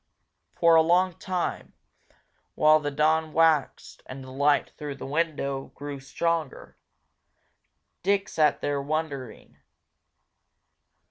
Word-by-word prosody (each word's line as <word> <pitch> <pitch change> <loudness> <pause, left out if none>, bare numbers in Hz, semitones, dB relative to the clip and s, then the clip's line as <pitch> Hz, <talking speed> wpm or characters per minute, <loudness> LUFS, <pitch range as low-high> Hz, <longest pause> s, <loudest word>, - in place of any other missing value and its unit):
For 170 -1 +4
a 160 - +7
long 180 +3 +2
time, 185 -2 -3 0.8
while 155 0 +5
the 145 -1 -3
dawn 155 +2 +1
waxed 160 -3 +1
and 130 +1 -8
the 130 - -11
light 145 +2 +1
through 145 -2 -6
the - - -8
window 140 -2 -2
grew 145 -1 -7
stronger, 160 +2 -3 1.3
Dick 200 +1 +1
sat 150 -2 +1
there 145 -1 -1
wondering. 140 -5 -5
150 Hz, 110 wpm, -26 LUFS, 140-165 Hz, 1.3 s, a